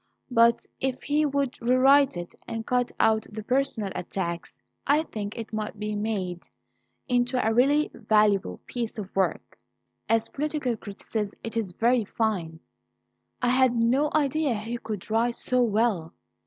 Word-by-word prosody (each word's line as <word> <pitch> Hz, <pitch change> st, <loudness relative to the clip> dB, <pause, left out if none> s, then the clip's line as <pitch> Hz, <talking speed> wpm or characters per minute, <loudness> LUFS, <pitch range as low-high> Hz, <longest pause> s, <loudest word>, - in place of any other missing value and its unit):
But 230 Hz, -1 st, +4 dB
if 260 Hz, -1 st, -2 dB
he 300 Hz, +1 st, +2 dB
would 280 Hz, -2 st, -2 dB
rewrite 260 Hz, 0 st, +5 dB
it 175 Hz, 0 st, -6 dB
and 225 Hz, 0 st, -4 dB
cut 250 Hz, -1 st, +1 dB
out 220 Hz, -1 st, +3 dB
the 215 Hz, 0 st, -6 dB
personal 250 Hz, -5 st, 0 dB
attacks, 170 Hz, -2 st, -4 dB, 0.3 s
I 295 Hz, +3 st, +4 dB
think 210 Hz, -7 st, -6 dB
it 225 Hz, -1 st, -7 dB
might 215 Hz, 0 st, -3 dB
be 210 Hz, +1 st, -3 dB
made 195 Hz, -5 st, -3 dB, 0.6 s
into 245 Hz, 0 st, +1 dB
a 225 Hz, -3 st, +2 dB
really 285 Hz, +6 st, +3 dB
valuable 210 Hz, -3 st, +2 dB
piece 235 Hz, -2 st, -4 dB
of 200 Hz, -3 st, -7 dB
work. 190 Hz, -1 st, -1 dB, 0.5 s
As 225 Hz, -1 st, +2 dB
political 290 Hz, -4 st, -2 dB
criticism 205 Hz, 0 st, -5 dB
it 230 Hz, -, -6 dB
is 210 Hz, -6 st, -2 dB
very 235 Hz, +4 st, +2 dB
fine. 190 Hz, -7 st, -2 dB, 0.8 s
I 245 Hz, -, +3 dB
had 255 Hz, -1 st, +4 dB
no 250 Hz, +6 st, +2 dB
idea 295 Hz, -3 st, +1 dB
he 225 Hz, +3 st, -4 dB
could 215 Hz, -5 st, -6 dB
write 235 Hz, +2 st, +2 dB
so 255 Hz, 0 st, +2 dB
well. 215 Hz, -7 st, +1 dB
230 Hz, 150 wpm, -26 LUFS, 210-255 Hz, 0.8 s, rewrite